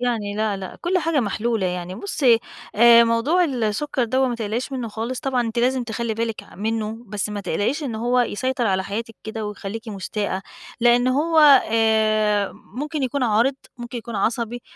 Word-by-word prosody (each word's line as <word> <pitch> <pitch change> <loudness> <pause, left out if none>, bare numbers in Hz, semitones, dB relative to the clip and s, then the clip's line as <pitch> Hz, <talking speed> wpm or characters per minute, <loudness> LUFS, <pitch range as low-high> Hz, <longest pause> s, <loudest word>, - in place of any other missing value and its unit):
يعني، 225 -5 -1
لأ، 215 -1 0
لأ، 190 -1 -8
كلّ 365 +2 +1
حاجة 325 -4 +1
محلولة، 220 -1 -1
يعني 180 0 -4
بُصّي 255 - +2 0.4
آآ، 235 +1 +7
موضوع 245 +11 +2
السكّر 255 0 -1
دَوّة 260 +3 +1
ما 240 - -2
تقلقيش 230 +3 -3
منُّه 250 -3 -3
خالص، 230 +4 -4
طبعًا 260 -2 0
أنتِ 230 -1 -2
لازِم 250 +1 +1
تخلّي 230 0 -3
بالِك 225 0 -3
ع - - -17
منُّه 220 +2 -2
بس 210 +1 -3
ما 210 -1 -4
تقلقيش 205 - -1
إن 260 -6 -3
هو 240 +3 +1
يسيطر 245 +1 -1
على 190 -2 +1
حياتِك 225 +3 -5
كده، 220 0 -5
ويخلّيكِ 210 +2 -6
مُستاءة 200 -1 -3 0.4
لأن 240 +1 +4
هو 315 +5 +2 0.3
آآ 215 -2 +2
ممكن 295 +3 -6
يكون 265 +1 -1
عارِض، 235 +3 +2 0.2
ممكن 240 0 -6
يكون 235 -1 -6
عصبي، 235 +3 -1
230 Hz, 175 wpm, -22 LUFS, 215-250 Hz, 0.4 s, آآ